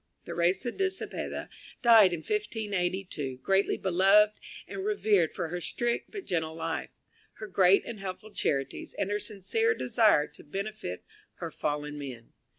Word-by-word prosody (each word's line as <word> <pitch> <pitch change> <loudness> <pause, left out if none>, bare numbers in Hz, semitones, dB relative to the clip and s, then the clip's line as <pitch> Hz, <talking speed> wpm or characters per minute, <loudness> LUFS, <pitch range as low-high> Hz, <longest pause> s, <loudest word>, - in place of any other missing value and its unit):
Theresa 180 +8 0
de 385 +6 0
Cepeda 375 - -5 0.4
died 225 -5 +8
in 170 -2 -3
1582, 190 - -2
greatly 195 +1 +2
beloved 195 +3 +5 0.3
and 385 - -5
revered 215 - +2
for 165 - -2
her 175 +1 -4
strict 235 +6 -2
but 405 -3 -7
gentle 160 -2 -1
life, 165 0 -3 0.4
her 215 - -8
great 190 -1 +4
and 225 -3 -6
helpful 195 +3 -6
charities, 135 -8 -2
and 200 0 -1
her 205 - 0
sincere 445 - 0
desire 225 - +4
to - - -15
benefit 195 - -5 0.3
her - - -6
fellow 150 0 -2
men. 135 -5 -8
195 Hz, 145 wpm, -29 LUFS, 165-220 Hz, 0.4 s, died